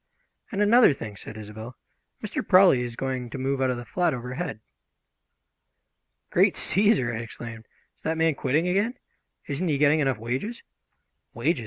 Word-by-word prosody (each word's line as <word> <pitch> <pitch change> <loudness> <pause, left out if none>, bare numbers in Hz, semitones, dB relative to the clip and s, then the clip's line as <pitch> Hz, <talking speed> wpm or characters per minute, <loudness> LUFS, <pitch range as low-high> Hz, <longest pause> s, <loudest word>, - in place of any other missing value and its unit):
"And 205 -1 +1
another 225 - +6
thing," 105 -5 -7
said 110 +2 -10
Isobel, 110 +3 -9 0.5
"Mr. 210 - -3
Prawley 185 -9 +6
is 120 -1 -5
going 130 -2 -3
to 125 - -6
move 135 +1 -1
out 130 - +2
of 125 - -1
the 120 - -7
flat 175 -2 0
overhead." 125 - -5 1.7
"Great - - +4
Cæsar!" 195 - +2
I - - -3
exclaimed. 115 -1 -9 0.3
"Is - - -30
that 160 0 -2
man 160 -1 +3
quitting 145 +5 0
again? 200 +7 +1 0.5
Isn't 150 +6 -2
he 150 -3 +1
getting 150 +2 +4
enough 135 -4 +1
wages?" 130 - -4 0.7
"Wages?" 165 -4 0
135 Hz, 160 wpm, -26 LUFS, 120-180 Hz, 1.7 s, another